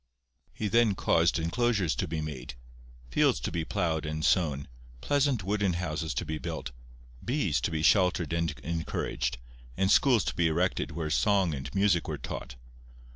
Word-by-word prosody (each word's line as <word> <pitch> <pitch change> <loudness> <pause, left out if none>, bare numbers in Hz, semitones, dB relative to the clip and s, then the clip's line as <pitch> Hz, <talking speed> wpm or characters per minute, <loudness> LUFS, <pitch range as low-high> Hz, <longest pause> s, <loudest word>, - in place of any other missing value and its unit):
He 110 - -3
then 110 -1 +3
caused 85 -2 +2
enclosures 95 +1 +1
to 90 - -1
be 80 0 -3
made, 65 -5 -6 0.6
fields - - +3
to - - -3
be 85 - -2
ploughed 80 -1 -1
and 75 0 -3
sown, 75 -7 +1 0.3
pleasant 140 - +1
wooden 100 -1 0
houses 80 -2 -3
to 90 - -2
be 80 0 -4
built, 80 -7 -5 0.5
bees 120 - 0
to - - 0
be 80 -1 -2
sheltered 90 -4 +3
and 85 0 +1
encouraged, 80 -6 -2 0.4
and 95 +1 +2
schools 125 -5 +5
to - - -1
be 85 -1 +2
erected 85 +4 0
where 80 0 -4
song 85 +5 +2
and 70 +4 -6
music 95 -4 +2
were - - -3
taught. - - -7
85 Hz, 165 wpm, -29 LUFS, 80-100 Hz, 0.6 s, schools